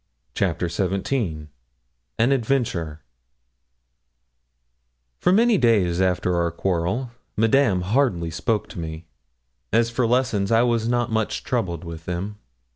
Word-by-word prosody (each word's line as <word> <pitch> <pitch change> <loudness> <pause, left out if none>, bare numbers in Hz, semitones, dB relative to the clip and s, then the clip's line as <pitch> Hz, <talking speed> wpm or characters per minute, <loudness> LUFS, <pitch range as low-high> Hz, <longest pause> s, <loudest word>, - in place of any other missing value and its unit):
CHAPTER 85 - 0
XVII 90 - -2 0.7
AN 120 +4 +3
ADVENTURE 110 - -1 2.2
For - - +3
many 225 +1 +4
days 95 -7 +3
after 90 -1 +1
our 85 0 +1
quarrel, 90 +8 -1 0.3
Madame 115 -3 +3
hardly 95 -5 +1
spoke 105 +6 -1
to - - -8
me. 80 0 -6 0.7
As 115 0 +2
for 120 0 +1
lessons, 120 -5 +1
I 115 +1 +5
was 115 -2 +1
not 120 -1 0
much 110 -1 -1
troubled 95 -10 -2
with 85 -1 -8
them. 95 +4 -4
105 Hz, 120 wpm, -23 LUFS, 85-120 Hz, 2.2 s, I